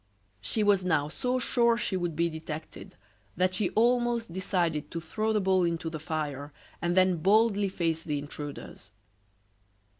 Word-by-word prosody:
She 215 - 0
was 200 -2 +3
now 155 -5 +1
so 250 +10 -1
sure 235 -2 +2
she 205 - -2
would 175 -3 -2
be 170 +2 +2
detected 160 -1 -7 0.4
that 185 +1 +2
she 185 0 +1
almost 235 -3 +2
decided 170 -5 -1
to 165 - -4
throw 215 +7 -2
the 215 - +2
bowl 190 -2 +2
into 165 -1 -1
the 155 - -5
fire, 150 -3 -4 0.3
and 175 +1 0
then 185 -1 +4
boldly 205 +3 +3
face 165 -3 -1
the 150 -3 -2
intruders. 145 -3 -8
180 Hz, 155 wpm, -29 LUFS, 160-210 Hz, 0.4 s, then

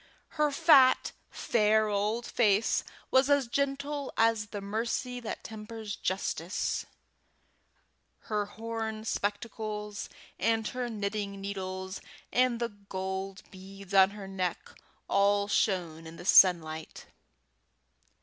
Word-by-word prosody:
Her 300 -1 +1
fat, 285 -3 +5 0.2
fair 215 -1 +2
old 210 +3 -1
face 215 -2 +2 0.3
was 260 +1 +4
as 285 -2 +4
gentle 280 +2 -2
as 225 -2 +3
the 205 -1 -6
mercy 230 +5 -2
that 235 - -6
tempers 220 -1 -7
justice; 185 -2 -2 1.3
her 210 -2 -2
horn 220 0 -5
spectacles 210 0 -3 0.3
and 225 -1 +1
her 250 -1 -3
knitting 200 -2 -3
needles 190 -1 -5 0.3
and 250 -2 +3
the 235 -1 -1
gold 190 -1 -5
beads 195 +1 -11
on 190 -1 +7
her 195 -2 -7
neck 185 -2 -3 0.4
all 200 +1 +3
shone 170 -6 0
in 160 - -10
the 175 - -10
sunlight. 160 -5 +4
210 Hz, 110 wpm, -30 LUFS, 195-230 Hz, 1.3 s, on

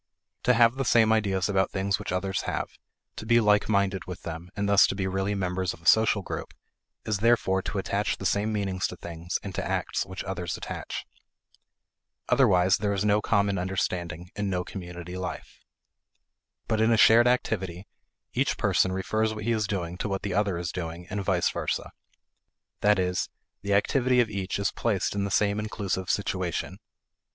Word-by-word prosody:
To 125 - +5
have 115 +2 +5
the 135 - 0
same 110 -3 +4
ideas 95 -4 +1
about 95 -2 +1
things 100 0 -1
which - - -5
others 95 +1 -1
have, - - -2 0.5
to - - -5
be 115 +1 +4
like 105 -2 +3
minded 100 -2 +1
with 90 -1 -8
them, 85 +1 -6
and 100 -1 -1
thus 100 -1 +6
to - - -3
be 95 -1 -2
really 95 +2 -1
members 95 -1 -1
of - - -21
a - - -20
social 110 -1 +4
group, - - -6 0.5
is 105 -2 -1
therefore 110 -4 +3
to 100 - -4
attach 100 +2 -1
the 95 - -7
same 105 +3 +1
meanings 95 -3 -1
to - - -8
things 85 +1 -4
and 100 - -6
to - - -2
acts - - -1
which 95 0 -7
others 90 -3 -4
attach. - - -6 1.2
Otherwise, 90 +1 +4
there 100 0 0
is 100 +1 -1
no 105 0 +3
common 100 -3 +1
understanding, 90 -2 -3
and 100 -1 -2
no 90 -1 -1
community 90 -1 -8
life. 90 -3 -6 1.1
But 110 -1 +1
in 110 +1 +4
a 115 - +4
shared 115 +3 +7
activity, 100 -7 -1 0.5
each - - 0
person 95 - +2
refers 110 +4 0
what 105 - -6
he 120 - 0
is 110 -2 0
doing 90 -3 -3
to 105 - -2
what 95 0 -2
the 100 - -2
other 100 -3 +1
is 85 -1 -3
doing 85 -1 -5
and 100 -1 -2
vice 95 -2 +1
versa. - - -3 0.9
That 105 0 +4
is, 90 -1 0 0.3
the 100 0 +1
activity 125 +4 +2
of 115 -3 +2
each 100 -2 -2
is 100 -1 0
placed 105 -6 -1
in 100 0 -1
the - - -2
same 100 +1 +2
inclusive 100 -3 -3
situation. 95 -1 -2
100 Hz, 185 wpm, -27 LUFS, 90-105 Hz, 1.2 s, shared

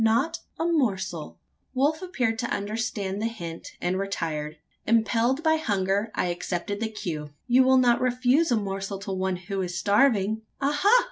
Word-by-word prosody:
Not 240 +10 +2 0.2
a 325 - 0
morsel!" 190 - -1 0.4
Wolf 295 +5 +2
appeared 250 -11 -1
to 235 - -1
understand 205 -1 -2
the 225 - +1
hint 170 -8 -7
and 180 +1 -1
retired. 160 -6 -3 0.3
Impelled 230 +5 +2
by 320 -1 +4
hunger, 200 -5 0
I - - +1
accepted 175 +3 -3
the 225 0 -1
cue: 160 -8 -5 0.2
"You 250 +1 +5
will 260 0 +5
not 245 -2 +4
refuse 255 +5 +2
a 235 - +4
morsel 195 -1 -3
to 200 0 -6
one 190 0 -1
who 190 +2 -4
is 180 -1 -3
starving?" 215 0 +3 0.2
"Aha! 290 +8 +2
215 Hz, 160 wpm, -26 LUFS, 190-255 Hz, 0.4 s, You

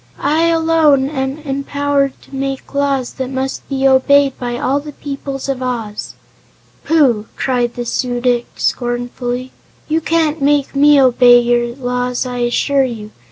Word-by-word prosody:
"I, 310 +3 +1
alone, 320 -4 +3
am 265 -1 -3
empowered 280 -1 -1
to 275 - -12
make 270 0 -4
laws 275 -3 0
that 260 -1 -4
must 265 0 -4
be 270 -1 +1
obeyed 275 +1 +4
by 240 -1 -3
all 270 +3 0
the 295 0 -9
peoples 275 -1 -6
of 270 -2 -2
Oz." 230 -5 -4 0.7
"Pooh!" 255 -10 +2
cried 245 -2 -1
the 240 - -4
Su 245 +1 -2
dic 245 -1 0
scornfully. 245 +1 -3 0.4
"You 320 +1 0
can't 320 -2 0
make 285 0 +1
me 290 +1 +5
obey 245 -2 +6
your 240 0 0
laws, 250 -1 -2
I 250 -1 -4
assure 270 +3 +1
you. 220 -4 -5
265 Hz, 150 wpm, -16 LUFS, 245-285 Hz, 0.7 s, obey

